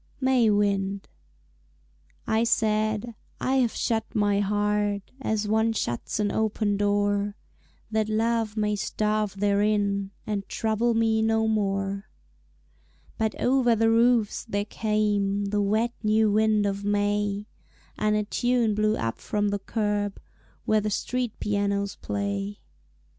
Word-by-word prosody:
May 260 -4 +3
Wind 200 -1 0 1.2
I 220 +1 +2
said, 215 0 +1 0.3
"I 265 +1 +1
have 245 -3 +2
shut 225 -1 -1
my 205 -1 +2
heart 205 0 0
As 215 -4 -1
one 220 +1 +2
shuts 120 - -3
an 205 -1 +1
open 215 -1 0
door, 205 0 +1 0.6
That 220 0 0
Love 225 0 0
may 210 -1 +1
starve 210 -1 -1
therein 200 -1 +1 0.2
And 205 -2 -3
trouble 225 +1 0
me 225 -1 +2
no 220 0 +2
more." 195 -1 -1 1.1
But 220 -1 -1
over 245 -2 +3
the 225 +1 +3
roofs 230 -2 +3
there 205 -3 -2
came 205 -2 0
The 205 +1 0
wet 220 +4 +1
new 215 0 +3
wind 215 0 +3
of 200 0 -2
May, 205 0 0 0.5
And 210 0 +1
a 210 - +1
tune 240 +1 +1
blew 215 +1 +1
up 115 0 -3
from 205 -1 -1
the 200 0 -1
curb 205 -1 -2 0.5
Where 215 0 +3
the 210 - -1
street 245 +2 -2
pianos 200 -1 -1
play. 200 0 -3
210 Hz, 130 wpm, -26 LUFS, 205-220 Hz, 1.2 s, May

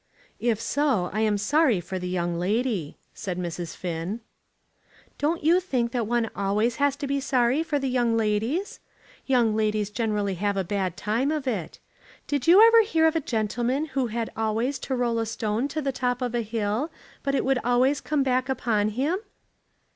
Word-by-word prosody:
"If 230 -3 +1
so, 230 -5 0
I 215 - -1
am 215 -2 +2
sorry 250 - +3
for 185 +2 -5
the 180 0 -4
young 175 -1 -1
lady," 205 - -1 0.2
said 185 -4 -5
Mrs. 175 -2 -4
Finn. 180 +5 -4 1.0
"Don't 310 +3 0
you 335 +4 +5
think 255 -10 -1
that 235 -3 -1
one 235 0 +1
always 210 +4 0
has 285 -1 +2
to 285 - -5
be 280 0 0
sorry 260 +1 +2
for 320 -3 -1
the 270 -1 -2
young 240 -3 +1
ladies? 225 - -1 0.5
Young 240 -5 +3
ladies 215 -1 0
generally 210 -3 -1
have 200 +2 -1
a 195 - +1
bad 185 -1 -2
time 230 +7 0
of 305 -3 -2
it. 200 -11 -3 0.5
Did 285 -2 -2
you 385 +6 +9
ever 460 0 +7
hear 330 -7 +2
of 320 0 +3
a 325 - +1
gentleman 240 +5 -1
who 265 -2 +1
had 230 0 -3
always 225 +5 -1
to 265 - -3
roll 240 -2 0
a 225 - 0
stone 220 +3 -1
to 300 +2 -4
the 275 - 0
top 250 0 -1
of 245 -1 -2
a 240 - +1
hill, 220 +5 -2 0.3
but 275 0 -1
it - - 0
would 265 -1 +2
always 255 +3 +2
come 295 -2 0
back 255 0 0
upon 220 -5 +1
him?" 280 - -1
235 Hz, 190 wpm, -25 LUFS, 210-275 Hz, 1.0 s, you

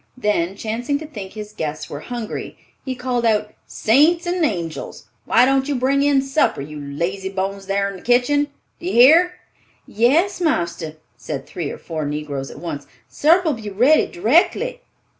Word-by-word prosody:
Then 195 -6 0
chancing 235 +7 -2
to 315 - -8
think 210 -11 -8
his 210 0 -8
guests 155 -3 -4
were 145 - -6
hungry, 240 +3 -6 0.3
he 260 -1 -4
called 250 -1 -2
out, 215 -2 +1
"Saints 310 - +3
and 350 0 0
angels! 170 - -3 0.2
Why 245 +2 +5
don't 270 +1 +2
you 290 - 0
bring 265 +2 +2
in 280 -1 +3
supper, 270 - +1
you 150 +2 -7
lazy 170 +7 -3
bones 195 0 -4
thar 200 0 +1
in 200 -1 -6
the - - -14
kitchen? 270 +4 +2 0.3
Do 345 - -6
you - - -1
hear?" 320 +9 +7 0.5
"Yes, 300 - +2
marster," 170 - -1 0.2
said 135 -3 -5
three 160 -5 -5
or - - -6
four 160 -2 -5
negroes 145 -2 -4
at - - -11
once, 150 -5 -6 0.2
"supper'll 325 +1 +3
be 220 -4 -6
ready 250 +10 +4
d'rectly." 345 - +1
225 Hz, 170 wpm, -21 LUFS, 175-285 Hz, 0.5 s, hear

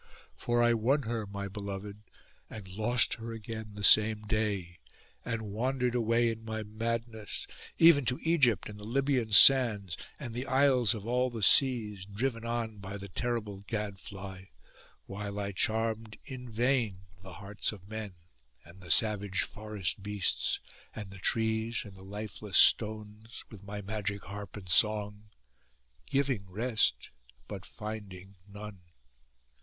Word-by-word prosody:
For 120 0 +1
I 120 0 +4
won 130 +6 +2
her, 115 -2 -3
my 100 0 -5
beloved, 100 0 -7 0.5
and 105 -3 -8
lost 120 +5 +2
her 115 0 -5
again 110 -1 -7
the 105 - -7
same 110 +1 +5
day, 100 -5 -2 0.4
and 115 -1 -3
wandered 125 +3 0
away 115 0 +2
in 110 0 -8
my 110 -1 -4
madness, 110 0 -4 0.3
even 165 -5 +7
to 125 +1 +1
Egypt 135 - +3
and 105 0 -9
the - - -10
Libyan 130 0 0
sands, 105 -5 +7 0.2
and 125 -6 -6
the 125 +3 -4
isles 130 -5 +4
of 105 -2 -7
all 125 +2 +1
the 115 -3 -5
seas, 105 -5 +4
driven 115 +3 -2
on 115 -3 -3
by 100 +1 -6
the 100 0 -9
terrible 110 -2 -2
gadfly, 100 -2 -6 0.6
while 100 +1 -5
I 100 0 -2
charmed 110 +1 -1
in 125 -2 -8
vain 115 -4 0 0.2
the 95 -1 -11
hearts 100 +3 -3
of 100 -3 -12
men, 110 -3 -6 0.5
and 85 +4 -15
the 90 - -12
savage 100 0 +2
forest 105 -4 -4
beasts, 100 -1 0 0.4
and 105 -3 -7
the 95 - -11
trees, 110 +1 0
and 105 - -11
the 95 - -14
lifeless 105 0 -4
stones, 110 +1 +2
with 100 -3 -11
my 100 +1 -6
magic 105 0 -3
harp 100 +2 -8
and 95 -3 -10
song, 105 +2 +1 0.8
giving 135 -8 0
rest, 105 - 0 0.4
but 100 -2 -7
finding 100 -3 -8
none. 105 -1 -9
110 Hz, 145 wpm, -30 LUFS, 100-115 Hz, 0.8 s, even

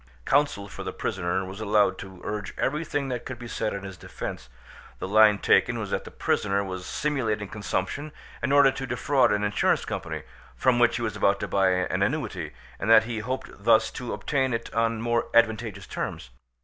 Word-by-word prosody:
Counsel 140 -8 +2
for - - -9
the - - -4
prisoner 95 0 -2
was 95 +3 -8
allowed 105 -3 +2
to 95 -2 -10
urge 105 -3 -5
everything 145 -1 -1
that 125 -2 -3
could 130 - -6
be 120 0 -8
said 110 - -2
in 100 -1 -5
his 95 -1 -8
defence: - - -7 0.5
the - - -5
line 105 +1 +6
taken - - +3
was - - -4
that - - -1
the - - -8
prisoner 100 -1 0
was 95 -2 -6
simulating 115 -9 -1
consumption 110 +7 -3 0.3
in 135 - 0
order 140 -1 +6
to 135 0 -5
defraud 130 -4 +2
an 105 0 +1
insurance 105 0 +1
company, - - -4 0.3
from 125 -2 +2
which 120 -1 +4
he 120 - -2
was 110 -2 -2
about 100 -1 +2
to - - -3
buy 95 -1 +2
an 90 0 0
annuity, - - -1 0.3
and 105 - -2
that 115 - +8
he 115 -1 -4
hoped 130 +5 -4
thus 110 0 +4
to 125 -2 -6
obtain 130 -4 0
it 115 - -6
on 115 0 +1
more 120 0 0
advantageous 110 -4 +2
terms. - - -5
110 Hz, 195 wpm, -26 LUFS, 100-125 Hz, 0.5 s, that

